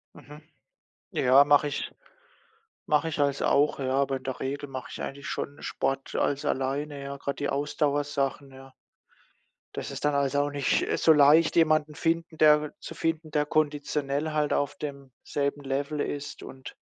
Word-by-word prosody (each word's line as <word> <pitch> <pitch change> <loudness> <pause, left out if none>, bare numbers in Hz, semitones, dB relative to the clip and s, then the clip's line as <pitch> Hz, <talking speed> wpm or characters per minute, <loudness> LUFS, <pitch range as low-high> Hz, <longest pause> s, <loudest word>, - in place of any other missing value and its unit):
Mhm. 150 +1 -13 0.7
Ja, 130 +2 +5
mache 145 0 +4
ich 145 - -4 0.9
mache 155 +2 +2
ich 155 - -5
alles 140 -1 +1
auch, 145 +1 +2
ja, 130 -1 -1
aber 135 -1 +1
in 130 - -15
der 130 -1 -4
Regel 140 +1 -4
mache 130 -1 -6
ich - - -7
eigentlich 140 +1 -6
schon 145 - -5
Sport 135 0 -3
alles 145 0 0
alleine, 140 +2 -2
ja, 140 0 -6
grade 140 0 -4
die 145 - -2
Ausdauersachen, 145 -1 -1
ja. 135 0 -14 1.0
Das - - -5
ist - - -7
dann 145 0 +2
halt 140 0 +1
auch 145 0 +1
nicht 140 -2 +1
so 160 - +6
leicht, 150 +2 +5
jemanden 155 -2 +3
finden, 165 0 -1
der 150 -1 +5
zu - - -8
finden, 165 -1 -2
der 150 -1 +1
konditionell 150 0 -1
halt 150 -1 0
auf 145 0 0
demselben 140 0 -4
Level 140 +2 -2
ist, 145 0 -4
und 130 -1 -10
145 Hz, 165 wpm, -27 LUFS, 140-150 Hz, 1.0 s, so